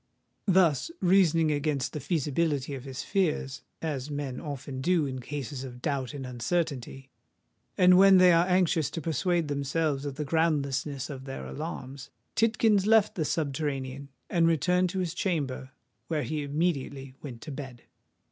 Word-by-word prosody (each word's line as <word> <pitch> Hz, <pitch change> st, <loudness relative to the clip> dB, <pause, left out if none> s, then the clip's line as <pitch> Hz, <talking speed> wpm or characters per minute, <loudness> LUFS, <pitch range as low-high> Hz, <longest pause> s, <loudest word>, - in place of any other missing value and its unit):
Thus 180 Hz, -, +3 dB
reasoning 170 Hz, -4 st, +4 dB
against 145 Hz, -2 st, -1 dB
the 150 Hz, -, -3 dB
feasibility 150 Hz, -2 st, -1 dB
of 135 Hz, -1 st, -7 dB
his 130 Hz, -1 st, -5 dB
fears,—as 150 Hz, -4 st, -2 dB
men 140 Hz, -3 st, -4 dB
often 140 Hz, -3 st, -6 dB
do 170 Hz, 0 st, +2 dB
in 130 Hz, -1 st, -4 dB
cases 140 Hz, 0 st, -5 dB
of 125 Hz, -2 st, -8 dB
doubt 135 Hz, -1 st, -2 dB
and 135 Hz, -2 st, -5 dB
uncertainty, 135 Hz, 0 st, -3 dB, 0.7 s
and 180 Hz, 0 st, +7 dB
when 195 Hz, -1 st, +8 dB
they 180 Hz, -1 st, +7 dB
are 170 Hz, +2 st, +4 dB
anxious 180 Hz, -5 st, +2 dB
to -, -, -5 dB
persuade 165 Hz, +2 st, 0 dB
themselves 145 Hz, 0 st, -1 dB
of 140 Hz, -2 st, -4 dB
the 150 Hz, +1 st, -3 dB
groundlessness 145 Hz, -3 st, 0 dB
of 135 Hz, -1 st, -8 dB
their 135 Hz, -, -6 dB
alarms,—Tidkins 140 Hz, -, -1 dB
left 220 Hz, -1 st, +5 dB
the 165 Hz, -8 st, -1 dB
subterranean, 140 Hz, -3 st, -2 dB, 0.2 s
and 170 Hz, -2 st, +3 dB
returned 180 Hz, +3 st, +2 dB
to 190 Hz, -, -5 dB
his 180 Hz, -3 st, -1 dB
chamber, 145 Hz, -9 st, -2 dB, 0.4 s
where 155 Hz, -3 st, -1 dB
he 155 Hz, -1 st, -2 dB
immediately 140 Hz, -3 st, -2 dB
went 120 Hz, -5 st, -8 dB
to 155 Hz, -, -7 dB
bed. 135 Hz, -3 st, -8 dB
145 Hz, 145 wpm, -28 LUFS, 135-170 Hz, 0.7 s, when